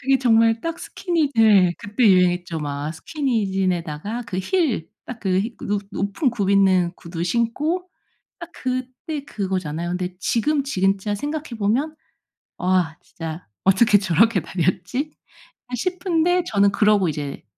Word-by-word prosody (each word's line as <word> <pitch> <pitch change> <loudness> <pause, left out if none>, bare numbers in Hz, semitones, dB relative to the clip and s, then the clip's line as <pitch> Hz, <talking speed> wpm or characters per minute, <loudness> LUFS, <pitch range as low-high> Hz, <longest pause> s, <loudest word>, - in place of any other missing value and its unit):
그게 270 +1 +2
정말 225 -2 +4
딱 330 0 -4
스키니 335 -6 -1
네 205 -6 +5
그때 210 +4 -1
유행했죠. 180 -3 +3
막 145 +1 -3
스키니진에다가 195 - -2
그 185 -2 -4
힐 245 - 0 0.2
딱 245 -2 -7
그 185 -2 +1
히 230 +3 -4
높 205 0 -1
높은 200 - -1
굽 205 -5 -1
있는 185 -3 +4
구두 170 0 -5
신고 290 - -1 0.5
딱 340 0 -9
그때 255 +4 -4
그거잖아요. 180 - -3
근데 180 0 -3
지금 280 +7 +1
진짜 195 -4 0
생각해 295 +6 -4
보면 245 +10 0 0.6
'와 180 -3 +1
진짜 165 0 -7 0.2
어떻게 205 +2 +5
저렇게 190 +2 +3
다녔지.' 185 - -2 0.6
아 250 - -4
싶은데 355 - +1
저는 200 -1 +3
그러고 205 -4 +3
이제 145 -2 -5
205 Hz, 275 characters per minute, -22 LUFS, 180-260 Hz, 0.6 s, 네